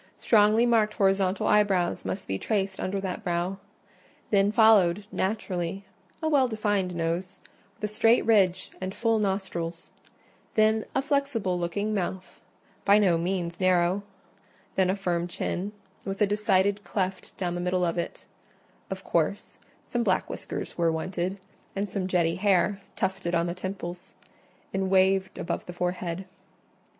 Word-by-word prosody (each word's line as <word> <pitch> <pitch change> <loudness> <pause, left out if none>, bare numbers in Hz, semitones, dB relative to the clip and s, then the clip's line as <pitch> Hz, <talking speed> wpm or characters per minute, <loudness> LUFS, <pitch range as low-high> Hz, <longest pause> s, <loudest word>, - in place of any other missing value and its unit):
Strongly 215 +1 +4
marked 220 -3 +2
horizontal 195 -2 +2
eyebrows 200 -4 +2
must 190 - -4
be 95 0 -2
traced 195 -3 -1
under 195 +1 -2
that 195 +2 -4
brow; 180 +1 -1 0.7
then 200 0 +4
followed, 210 -4 +5
naturally, 190 -2 -2 0.4
a - - +2
well 280 -4 +4
defined 205 -5 -1
nose, 170 +3 -2 0.4
with - - -22
a 210 - -9
straight 225 +2 +4
ridge 190 -5 +3
and 185 +1 -4
full 225 -1 +2
nostrils; 185 -4 -3 0.6
then 220 0 +3
a 270 - +2
flexible 275 - 0
looking 200 +5 -1
mouth, 190 -1 -4 0.4
by 200 +1 +6
no 195 -5 +4
means 175 0 -2
narrow; 185 +1 +3 0.7
then 190 -1 +2
a 190 - +2
firm 175 -3 -1
chin, 180 +2 -3 0.3
with 195 0 -4
a 210 - +5
decided 205 -1 +1
cleft 190 -2 -3
down 175 -2 -1
the 175 - -3
middle 180 0 +1
of 170 - -1
it: 170 - -5 0.6
of - - -5
course, - - -1 0.3
some 240 - -1
black 190 -5 +1
whiskers - - -6
were 165 -1 +3
wanted, 180 +3 -2 0.4
and 200 +1 -1
some 195 -1 -3
jetty 170 -2 +1
hair, 200 0 +2
tufted 190 -2 -1
on 170 0 +2
the 170 - -2
temples, 180 -1 -6 0.6
and 190 0 0
waved 190 0 +3
above - - -3
the 180 - -6
forehead. 180 0 -3
190 Hz, 145 wpm, -27 LUFS, 180-205 Hz, 0.7 s, by